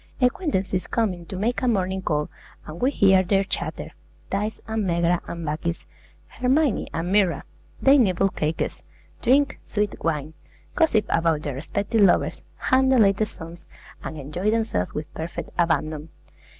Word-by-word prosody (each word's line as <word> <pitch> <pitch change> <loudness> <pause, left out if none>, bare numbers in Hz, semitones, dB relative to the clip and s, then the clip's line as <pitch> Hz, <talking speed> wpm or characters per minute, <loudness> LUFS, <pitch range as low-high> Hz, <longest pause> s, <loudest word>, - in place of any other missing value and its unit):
Acquaintances 225 - 0
come 225 -5 +1
in 175 -2 -11
to - - -6
make 220 +6 -1
a 255 - 0
morning 190 -4 0
call, 150 -4 0 0.4
and 155 +2 -9
we 255 - +4
hear 195 -8 +5
their 195 +1 +2
chatter, 195 - -3 0.4
Thaïs 210 +2 -2
and 220 -1 -1
Megara 170 -1 +1
and 170 -1 -5
Bacchis, 160 +3 -3 0.4
Hermione 265 0 +1
and 170 +2 -3
Myrrha. 195 -4 +2 0.4
They 275 +1 +6
nibble 195 -4 +3
cakes, 155 -3 -2 0.4
drink 275 +4 +3
sweet 210 -1 -1
wine, 155 -2 -1 0.4
gossip 310 -11 +3
about 160 -2 +1
their 145 - -3
respective 200 - -1
lovers, 195 -3 +3
hum 260 0 +2
the 265 - +4
latest 205 -1 +3
songs, 170 0 -10 0.4
and 160 - -6
enjoy 150 +8 -2
themselves 220 - 0
with 155 +1 -5
perfect 160 +2 -6
abandon. 155 -2 0
190 Hz, 150 wpm, -24 LUFS, 165-220 Hz, 0.4 s, They